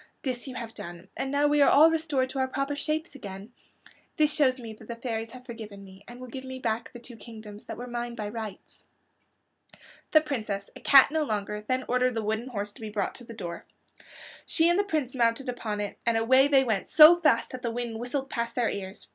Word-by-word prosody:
This 255 Hz, -1 st, -3 dB
you 260 Hz, -, -7 dB
have 230 Hz, -2 st, -6 dB
done, 175 Hz, +2 st, -9 dB
and 270 Hz, -, -3 dB
now 285 Hz, +1 st, +2 dB
we 295 Hz, 0 st, +3 dB
are 280 Hz, -, +7 dB
all 315 Hz, +3 st, +7 dB
restored 305 Hz, -5 st, 0 dB
to 270 Hz, -, -4 dB
our 260 Hz, -, +2 dB
proper 275 Hz, +2 st, -2 dB
shapes 310 Hz, +2 st, -2 dB
again. 200 Hz, -3 st, -9 dB, 0.6 s
This 300 Hz, -1 st, +3 dB
shows 265 Hz, -4 st, +2 dB
me 230 Hz, -2 st, -7 dB
that 215 Hz, -, -15 dB
the 235 Hz, -, -5 dB
fairies 230 Hz, -2 st, -4 dB
have 250 Hz, +2 st, -12 dB
forgiven 215 Hz, -5 st, -9 dB
me 190 Hz, 0 st, -14 dB
and 240 Hz, +1 st, -11 dB
will 255 Hz, -, -8 dB
give 260 Hz, +2 st, -7 dB
me 260 Hz, 0 st, -7 dB
back 230 Hz, -2 st, -2 dB
the -, -, -10 dB
two 240 Hz, 0 st, -10 dB
kingdoms 220 Hz, -2 st, -11 dB
that -, -, -7 dB
were 245 Hz, -, -6 dB
mine 240 Hz, -1 st, -4 dB
by 210 Hz, -3 st, -4 dB
rights." 215 Hz, -3 st, -8 dB, 1.2 s
The 310 Hz, -, +6 dB
Princess, 215 Hz, -9 st, -4 dB
a -, -, -9 dB
cat 275 Hz, 0 st, +7 dB
no 315 Hz, 0 st, +1 dB
longer, 210 Hz, -4 st, -3 dB
then 255 Hz, 0 st, 0 dB
ordered 250 Hz, 0 st, +1 dB
the 225 Hz, -, -1 dB
wooden 220 Hz, +3 st, -2 dB
horse 205 Hz, -4 st, -4 dB
to 205 Hz, -, -15 dB
be 220 Hz, -, -5 dB
brought 205 Hz, -2 st, -2 dB
to 245 Hz, -, -11 dB
the 230 Hz, -1 st, -10 dB
door. 170 Hz, -5 st, -7 dB, 0.8 s
She 325 Hz, 0 st, +3 dB
and 345 Hz, +3 st, +3 dB
the -, -, +3 dB
Prince 310 Hz, -10 st, -2 dB
mounted 240 Hz, +1 st, +1 dB
upon 220 Hz, -4 st, -3 dB
it, 205 Hz, -1 st, -4 dB
and 230 Hz, -1 st, +2 dB
away 260 Hz, +4 st, +5 dB
they 275 Hz, -2 st, +5 dB
went, 220 Hz, -6 st, -1 dB
so 310 Hz, +2 st, +9 dB
fast 295 Hz, -9 st, +2 dB
that 255 Hz, -, -7 dB
the 240 Hz, -, -2 dB
wind 230 Hz, -1 st, -4 dB
whistled 265 Hz, +3 st, -3 dB
past 235 Hz, -2 st, -3 dB
their 240 Hz, -2 st, +1 dB
ears. 190 Hz, -1 st, -6 dB
240 Hz, 230 wpm, -27 LUFS, 220-270 Hz, 1.2 s, so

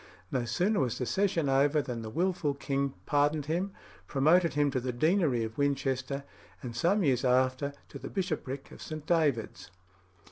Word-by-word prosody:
No 125 Hz, -3 st, 0 dB
sooner 190 Hz, -, +1 dB
was 125 Hz, -4 st, 0 dB
the 125 Hz, -, -2 dB
session 185 Hz, -2 st, +1 dB
over 140 Hz, +3 st, +3 dB
than 125 Hz, -5 st, -3 dB
the 110 Hz, -, -6 dB
wilful 170 Hz, +1 st, 0 dB
king 140 Hz, -1 st, -1 dB
pardoned 145 Hz, 0 st, +2 dB
him, 175 Hz, +6 st, -1 dB, 0.4 s
promoted 160 Hz, +4 st, +3 dB
him 145 Hz, -1 st, +2 dB
to 130 Hz, -, 0 dB
the 125 Hz, +1 st, -2 dB
deanery 150 Hz, -, +2 dB
of 110 Hz, +3 st, -6 dB
Winchester, 140 Hz, -1 st, 0 dB, 0.4 s
and 120 Hz, -2 st, -6 dB
some 185 Hz, -, +2 dB
years 130 Hz, -5 st, +2 dB
after 130 Hz, +2 st, +2 dB, 0.2 s
to 140 Hz, -, -8 dB
the 135 Hz, -, -7 dB
bishopric 155 Hz, -8 st, -3 dB
of -, -, -12 dB
St. 155 Hz, -1 st, -6 dB
David's. 135 Hz, -, 0 dB
140 Hz, 170 wpm, -30 LUFS, 130-160 Hz, 0.4 s, over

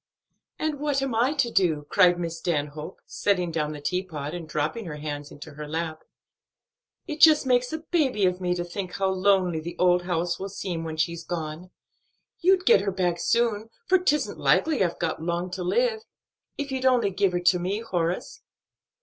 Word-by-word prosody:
"And 310 Hz, -2 st, -2 dB
what 285 Hz, -2 st, 0 dB
am 270 Hz, -3 st, -2 dB
I 245 Hz, +6 st, +2 dB
to 270 Hz, -5 st, 0 dB
do?" 160 Hz, -8 st, +1 dB
cried 175 Hz, -1 st, +5 dB
Miss 165 Hz, -1 st, -4 dB
Stanhope, 155 Hz, -1 st, -3 dB
setting 180 Hz, -4 st, 0 dB
down 155 Hz, -2 st, -1 dB
the 150 Hz, -, -7 dB
teapot, 155 Hz, -3 st, -3 dB
and 170 Hz, -3 st, -7 dB
dropping 155 Hz, +9 st, -2 dB
her 160 Hz, -3 st, -6 dB
hands 145 Hz, -1 st, -5 dB
into 145 Hz, -, -11 dB
her 150 Hz, +1 st, -8 dB
lap. 160 Hz, 0 st, -3 dB, 1.0 s
"It 305 Hz, -3 st, -6 dB
just 310 Hz, -3 st, +7 dB
makes 250 Hz, -1 st, +2 dB
a 315 Hz, -, -2 dB
baby 265 Hz, -, +2 dB
of 180 Hz, 0 st, 0 dB
me 180 Hz, -1 st, 0 dB
to 175 Hz, -, -2 dB
think 180 Hz, +1 st, -6 dB
how 195 Hz, -1 st, 0 dB
lonely 185 Hz, -3 st, +2 dB
the 170 Hz, +2 st, -7 dB
old 180 Hz, 0 st, +4 dB
house 175 Hz, -1 st, -1 dB
will 195 Hz, -, -4 dB
seem 180 Hz, -4 st, -4 dB
when 160 Hz, -1 st, -5 dB
she's 170 Hz, +1 st, -1 dB
gone. 165 Hz, +1 st, -5 dB, 0.7 s
You'd 370 Hz, +1 st, +3 dB
get 195 Hz, -, +6 dB
her 200 Hz, 0 st, -1 dB
back 180 Hz, -2 st, 0 dB
soon, 225 Hz, -1 st, +1 dB, 0.2 s
for 375 Hz, 0 st, +4 dB
'tisn't 300 Hz, -5 st, 0 dB
likely 305 Hz, -10 st, +3 dB
I've 175 Hz, -2 st, -1 dB
got 160 Hz, -1 st, -2 dB
long 175 Hz, +2 st, -2 dB
to 185 Hz, 0 st, -4 dB
live, 460 Hz, -, +1 dB, 0.6 s
if 285 Hz, -1 st, -4 dB
you'd 260 Hz, 0 st, 0 dB
only 240 Hz, -6 st, +3 dB
give 190 Hz, 0 st, +1 dB
her 175 Hz, -, +1 dB
to 180 Hz, 0 st, +3 dB
me, 190 Hz, +5 st, -2 dB
Horace." 190 Hz, -, -2 dB
180 Hz, 190 wpm, -26 LUFS, 165-235 Hz, 1.0 s, just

